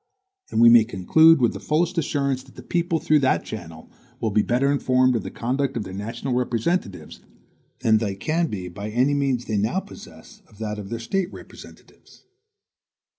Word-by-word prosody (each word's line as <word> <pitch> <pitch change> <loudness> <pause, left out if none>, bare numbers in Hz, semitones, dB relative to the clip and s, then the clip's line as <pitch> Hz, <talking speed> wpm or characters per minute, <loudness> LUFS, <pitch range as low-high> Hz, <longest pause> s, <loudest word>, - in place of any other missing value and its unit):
And - - -1
we 115 0 +8
may 120 -1 +7
conclude 150 - +4
with 120 -2 +2
the - - -7
fullest 170 +4 0
assurance 140 -5 -1
that 130 0 -19
the - - -11
people, 170 -1 -1
through 155 -1 +2
that 130 -2 +1
channel, 85 -7 -9 0.3
will 110 - -1
be 105 - +3
better 125 +5 +1
informed 130 -2 +2
of 115 - 0
the - - -6
conduct 135 +2 -2
of 110 - -2
their 95 - -9
national 115 +6 -4
representatives, 125 - -2 0.6
than 110 -1 +3
they 100 -3 -2
can 160 - -1
be 95 -8 -5
by 100 +4 -7
any 125 +6 +1
means 135 -4 0
they 110 - -2
now 110 - 0
possess 210 +2 -14
of 105 - -21
that 105 -1 -4
of 100 -1 -8
their 115 - -3
State 185 - -2
representatives. - - -15
125 Hz, 185 wpm, -23 LUFS, 110-145 Hz, 0.6 s, we